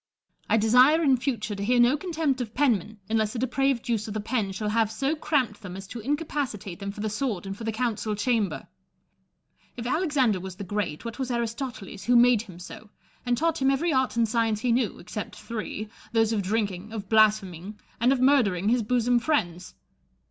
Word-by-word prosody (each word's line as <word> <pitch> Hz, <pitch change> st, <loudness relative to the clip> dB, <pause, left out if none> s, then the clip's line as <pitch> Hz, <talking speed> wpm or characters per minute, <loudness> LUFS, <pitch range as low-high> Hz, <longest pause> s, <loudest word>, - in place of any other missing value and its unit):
I -, -, +4 dB
desire 250 Hz, +9 st, +5 dB
in 270 Hz, -3 st, +5 dB
future 235 Hz, -4 st, -2 dB
to 200 Hz, 0 st, -4 dB
hear 245 Hz, +4 st, +2 dB
no 240 Hz, +4 st, +5 dB
contempt 310 Hz, -5 st, -1 dB
of 225 Hz, -3 st, -6 dB
penmen, 220 Hz, -6 st, +1 dB
unless 220 Hz, 0 st, 0 dB
a -, -, -2 dB
depraved 260 Hz, 0 st, 0 dB
use 225 Hz, -3 st, -1 dB
of 210 Hz, -, -6 dB
the -, -, -1 dB
pen 215 Hz, -2 st, -1 dB
shall 210 Hz, +2 st, -3 dB
have 220 Hz, 0 st, +1 dB
so 270 Hz, +7 st, -1 dB
cramped 265 Hz, -9 st, 0 dB
them 185 Hz, -3 st, -7 dB
as 195 Hz, -, -8 dB
to 240 Hz, -, -6 dB
incapacitate 265 Hz, -, -3 dB
them 200 Hz, 0 st, -4 dB
for 205 Hz, -, -8 dB
the 215 Hz, -, -1 dB
sword 215 Hz, -5 st, -2 dB
and 195 Hz, 0 st, -5 dB
for 225 Hz, -, -8 dB
the 225 Hz, -, 0 dB
Council 220 Hz, -2 st, -2 dB
Chamber. 220 Hz, -2 st, -1 dB, 1.1 s
If 235 Hz, -, -5 dB
Alexander 265 Hz, -, +1 dB
was 185 Hz, 0 st, -7 dB
the 200 Hz, -, -7 dB
Great, 200 Hz, -3 st, -3 dB
what 230 Hz, +3 st, -6 dB
was 260 Hz, -1 st, -2 dB
Aristoteles 230 Hz, -4 st, -4 dB
who 245 Hz, +2 st, +3 dB
made 240 Hz, -2 st, +6 dB
him 190 Hz, -7 st, -12 dB
so, 200 Hz, +4 st, -10 dB, 0.4 s
and 245 Hz, 0 st, +2 dB
taught 325 Hz, +1 st, 0 dB
him 265 Hz, -, +4 dB
every 295 Hz, +5 st, +1 dB
art 260 Hz, -4 st, +1 dB
and 230 Hz, -1 st, +3 dB
science 225 Hz, -1 st, 0 dB
he 245 Hz, -1 st, +1 dB
knew, 235 Hz, -4 st, +1 dB
except 205 Hz, +4 st, -7 dB
three, 215 Hz, -2 st, -5 dB
— -, -, -22 dB
those 225 Hz, -1 st, +3 dB
of 210 Hz, -, +1 dB
drinking, 200 Hz, 0 st, -2 dB
of 205 Hz, -3 st, -5 dB
blaspheming, 210 Hz, -3 st, +2 dB, 0.2 s
and 240 Hz, +3 st, +4 dB
of 270 Hz, -, +2 dB
murdering 225 Hz, -8 st, +3 dB
his 245 Hz, +1 st, +3 dB
bosom 245 Hz, +2 st, +2 dB
friends 180 Hz, -, -1 dB
225 Hz, 205 wpm, -26 LUFS, 210-255 Hz, 1.1 s, made